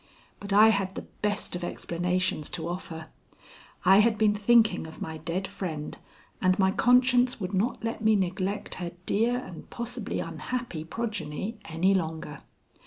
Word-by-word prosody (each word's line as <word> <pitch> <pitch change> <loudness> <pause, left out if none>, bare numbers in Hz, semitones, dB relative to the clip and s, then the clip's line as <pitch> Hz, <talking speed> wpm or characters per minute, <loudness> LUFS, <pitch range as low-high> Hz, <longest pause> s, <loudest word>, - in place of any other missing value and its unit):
But 200 0 -7
I 210 +2 +8
had 195 -3 0
the - - -5 0.2
best 210 -3 0
of 175 - -4
explanations 175 -2 -1
to 165 -1 -4
offer. 165 -2 -6 0.8
I 190 +2 +7
had 220 0 +4
been 215 -1 +4
thinking 215 -3 +3
of 160 - -11
my 160 0 -5
dead 175 +5 -3
friend, 165 -7 -5 0.5
and 185 0 +3
my 190 -1 +3
conscience 250 +2 +4
would 190 0 -4
not 215 +7 0
let 230 -1 -3
me 220 0 +5
neglect 190 +1 -1
her 175 -1 -4
dear 230 +5 +2
and 185 -9 -8
possibly 235 -2 -4
unhappy 165 +2 -4
progeny 215 +1 -4
any 165 +5 +2
longer. 160 -5 -3
195 Hz, 155 wpm, -28 LUFS, 170-220 Hz, 0.8 s, I